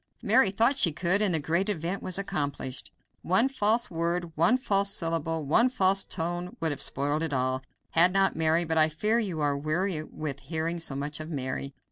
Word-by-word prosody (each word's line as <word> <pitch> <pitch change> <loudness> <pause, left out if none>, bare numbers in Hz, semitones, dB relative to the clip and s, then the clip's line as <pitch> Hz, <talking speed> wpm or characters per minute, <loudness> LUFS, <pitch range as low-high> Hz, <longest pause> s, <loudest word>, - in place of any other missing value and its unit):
Mary 260 -7 +5
thought 230 +8 +2
she 180 -10 +3
could,... 180 +6 +1
and 205 -3 +3
the 160 - +2
great 170 +7 -1
event 175 0 -3
was 185 - 0
accomplished. 145 -8 -4 0.3
One 190 +9 +3
false 230 -4 0
word, 170 0 -2
one 170 +11 +4
false 200 -5 +1
syllable, 165 -4 -1
one 230 - +4
false 195 -5 +3
tone 175 +1 -4
would 165 -2 -1
have 145 - -5
spoiled 145 +3 0
it 160 -3 -2
all, 130 0 -1 0.3
had 170 +2 +4
not 195 0 +2
Mary 160 +1 +1
but 160 0 0
I 155 0 +5
fear 210 +9 0
you 185 -9 -2
are 145 -1 +1
weary 155 +3 -1
with 150 -3 -6
hearing 160 +4 -3
so 160 -4 -2
much 145 +2 -5
of 155 +1 -7
Mary. 140 -1 -4
165 Hz, 195 wpm, -27 LUFS, 155-195 Hz, 0.3 s, Mary